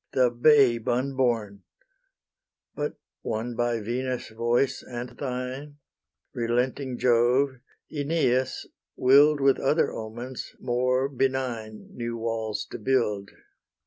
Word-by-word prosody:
The 125 -2 +3
babe 120 -2 +4
unborn: 120 -5 0 1.1
But, - - -3 0.3
won 115 +2 -3
by 120 0 0
Venus' 125 +3 -3
voice 120 +4 0
and 120 0 -6
thine, 130 +3 -5 0.6
Relenting 125 +2 -1
Jove 125 +3 +3 0.3
Aeneas 140 -4 0 0.3
will'd 145 +3 +5
With 135 -1 +3
other 150 +4 +2
omens 120 +3 -7
more 125 +1 +1
benign 130 -5 -2
New 120 -1 -4
walls 110 -2 -2
to - - -6
build. 105 -5 0
125 Hz, 100 wpm, -26 LUFS, 115-130 Hz, 1.1 s, will'd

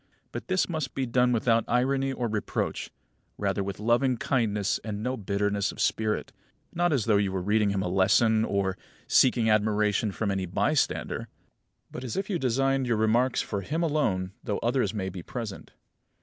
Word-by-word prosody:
But - - -6
this 185 -1 +1
must 155 -6 -3
be 135 - 0
done 125 +1 +2
without 115 -1 +2
irony 135 +2 +1
or 125 -2 -2
reproach, 105 -1 -2 0.5
rather 100 - -1
with 100 0 -5
loving 120 +3 +2
kindness 105 -6 0
and 105 -1 -4
no 130 +2 -1
bitterness 100 -1 -1
of - - -13
spirit; 110 -1 0 0.4
not 175 0 +1
as 130 -8 +1
though 110 -3 +4
you 100 -1 +1
were 95 -1 -2
reading 105 +1 +2
him 100 -1 0
a - - -2
lesson, 105 +4 +3
or 100 -3 -1 0.3
seeking 120 -3 +4
admiration 105 -1 +2
from 100 +1 -2
any 95 -1 -2
bystander, 145 - 0 0.6
but 125 - -7
as 125 - -4
if 195 +1 -2
you 175 - 0
designed 135 +1 +1
your 115 -2 +1
remarks 115 +4 +2
for 100 -2 -3
him 155 - -2
alone, 110 - 0
though 105 -5 -2
others 125 +2 +1
may 100 -3 -3
be 90 -1 -7
present. 110 0 -6
110 Hz, 180 wpm, -27 LUFS, 100-130 Hz, 0.6 s, though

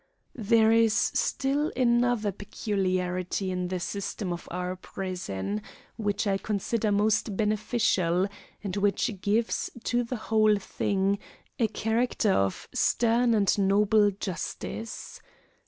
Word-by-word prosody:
There 225 -1 +3
is 225 -1 +4
still 280 +3 +1
another 240 -3 +2
peculiarity 185 -2 -2
in 180 -1 -2
the 185 0 -2
system 195 0 -3
of 175 - -8
our 180 +1 -3
prison, 105 - -4 0.3
which 205 -1 -1
I 195 -1 +1
consider 215 +1 -1
most 210 0 +1
beneficial, 210 -4 +1 0.4
and 195 -2 -3
which 200 0 0
gives 220 +4 0
to 245 0 +1
the 240 +2 -4
whole 215 -2 +3
thing 200 0 0 0.4
a 230 - +3
character 225 0 0
of 95 - 0
stern 235 0 +3
and 200 -3 +3
noble 205 +2 +4
justice. 200 +3 -6
205 Hz, 115 wpm, -27 LUFS, 185-225 Hz, 0.4 s, is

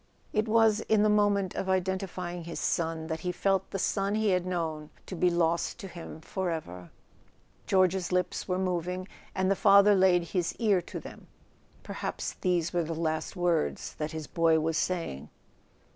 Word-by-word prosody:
It 215 +1 +1
was 220 -1 +4
in 215 -1 +4
the 215 - +4
moment 205 -3 +2
of 190 - -3
identify¬ 190 -1 -1
ing 175 -2 -7
his 170 - -5
son 165 -1 -1
that 160 0 -3
he 180 - -2
felt 195 +1 0
the - - -3
son 195 +1 0
he 220 -1 +1
had 180 -1 +1
known 160 -4 -3 0.2
to 185 - -6
be 180 +1 +3
lost 170 -1 0
to 200 - -8
him 170 -3 -9
forever. 160 - -4 0.8
George's 185 -1 +2
lips 180 0 -1
were 180 -1 0
moving, 180 0 -2 0.3
and 190 0 +1
the - - +3
father 200 +1 +6
laid 185 -2 +4
his 180 -3 -1
ear 205 -6 +2
to - - -7
them; - - -12 0.6
perhaps - - -4
these 175 -3 +1
were 175 - +2
last 160 +1 -2
words 175 -3 0
that 150 0 -2
his 160 -1 -5
boy 165 0 +2
was 160 +1 -1
saying. 165 - -2
180 Hz, 175 wpm, -29 LUFS, 165-195 Hz, 0.8 s, father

